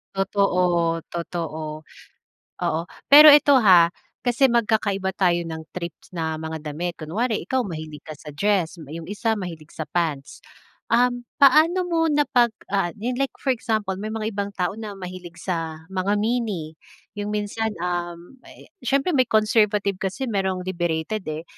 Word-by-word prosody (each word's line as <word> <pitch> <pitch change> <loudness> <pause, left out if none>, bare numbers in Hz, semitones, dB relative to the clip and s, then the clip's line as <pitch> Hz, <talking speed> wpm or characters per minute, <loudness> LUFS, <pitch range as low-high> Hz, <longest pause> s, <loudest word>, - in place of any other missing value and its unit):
Totoo, 180 -4 +1
totoo. 160 -3 -5 0.8
Oo, 160 - 0 0.3
pero 300 +2 +11
eto, 285 -2 +7
ha, 175 -5 +6 0.3
kasi 245 +2 +3
magkakaiba 210 -5 +1
tayo 175 -2 +1
ng 160 -1 -6
trip 170 -2 -4 0.2
na 160 -3 -3
mga 160 0 -5
damit 170 +3 -4
kunwari 210 +9 -1
ikaw 260 0 0
mahilig 155 -7 -7
ka 155 -1 -9
sa 150 0 -11
dress, 180 +1 0
yung 165 +2 -7
isa 215 +3 -1
mahilig 165 -6 -7
sa 155 - -3
pants, 155 -5 -3 0.5
um, 245 +1 +3 0.2
paano 310 +6 +5
mo 330 -2 +1
na 295 0 +3
pag, 245 -2 +4 0.2
ah, 195 -3 +1
yan 240 +4 -2
like 275 - +1
for 270 - +1
example 220 -5 -2
may 215 - -4
mga 220 0 -3
ibang 200 0 -2
tao 180 0 0
na 215 -2 -7
mahilig 180 -2 -8
sa 165 -3 -4
mga 195 +2 0
mini 210 -8 -1 0.4
yung 205 0 -4
minsan, 210 +1 -2 0.2
um, 175 +2 -4
eh, - - -16
siyempre 275 +6 +1
may 255 -3 +3
conservative 210 -2 +2
kasi 195 +7 -3
mayrong 190 -4 -1
liberated, 175 +2 -2
eh. 155 +1 -5
195 Hz, 155 wpm, -23 LUFS, 170-225 Hz, 0.8 s, pero